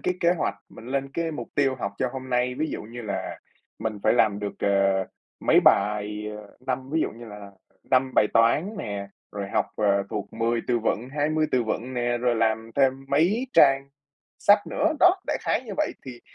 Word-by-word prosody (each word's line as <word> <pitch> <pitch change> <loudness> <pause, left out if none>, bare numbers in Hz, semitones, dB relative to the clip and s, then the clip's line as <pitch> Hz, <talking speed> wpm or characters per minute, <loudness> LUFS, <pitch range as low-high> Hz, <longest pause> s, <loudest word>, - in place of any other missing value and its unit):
cái 180 - 0
kế 170 0 +4
hoạch, 175 - -1
mình 110 - -13
lên 135 +1 -2
cái 165 -1 -1
mục 150 - -6
tiêu 135 -2 +2
học 100 -3 -3
cho 130 - +1
hôm 130 -1 -7
nay. 125 0 +1
Ví 155 +4 -2
dụ - - -5
như 120 +3 -9
là 100 -3 -4 0.4
mình 110 -2 -3
phải - - +4
làm 110 -4 +3
được, 105 -1 -4
ờ, 100 -1 +2 0.4
mấy - - +5
bài, 105 +1 +2
ờ, 105 -1 -13
năm 130 +1 -3
ví 160 +2 +1
dụ - - 0
như 120 +1 -11
là 105 -2 -10 0.4
5 130 0 +3
bài - - +5
toán 115 - +3
nè, 100 - -5 0.2
rồi 100 -1 -4
học, - - +1
ờ, 100 -2 +2
thuộc 105 - -5
10 115 +1 0
từ 120 -1 +2
vựng, 115 +2 -1
20 155 +2 +1
từ 125 - +3
vựng 120 +3 -3
nè, 120 0 0
rồi 120 -1 +1
làm 110 0 0
thêm 135 -1 +2
mấy 175 - +2
trang 135 -1 +5 0.5
sách 205 +1 +6
nữa. 315 +2 +1
Đó, 360 +1 +6
đại - - 0
khái - - 0
như - - -6
vậy 305 0 0
thì 125 -2 -8
120 Hz, 210 wpm, -25 LUFS, 105-140 Hz, 0.5 s, sách